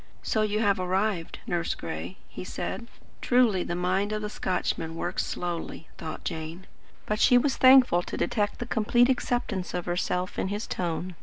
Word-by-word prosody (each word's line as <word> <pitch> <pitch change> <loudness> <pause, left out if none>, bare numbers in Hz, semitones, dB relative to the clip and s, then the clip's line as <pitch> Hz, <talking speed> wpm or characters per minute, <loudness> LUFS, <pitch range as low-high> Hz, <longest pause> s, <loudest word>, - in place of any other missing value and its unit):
"So 220 - +1
you 215 0 +1
have 200 -3 +3
arrived, 185 -1 -1
Nurse 170 -1 -1
Gray," 85 +2 -6
he - - -8
said. 185 +6 -5 0.3
"Truly 245 -7 +3
the 175 - -2
mind 185 +3 0
of 215 0 -2
a 210 - -2
Scotchman 165 -4 -2
works 175 +2 -2
slowly," 170 -2 -4
thought 160 -1 -6
Jane, 160 +3 -5 0.4
but 210 0 -1
she 245 - +6
was 270 +2 +2
thankful 255 -9 +7
to - - -6
detect 205 -3 0
the 240 - -4
complete 240 +2 +3
acceptance 240 -8 -1
of 180 - -2
herself 180 +1 -1
in - - 0
his 205 +3 -3
tone. 180 +1 -3
185 Hz, 170 wpm, -27 LUFS, 175-215 Hz, 0.4 s, thankful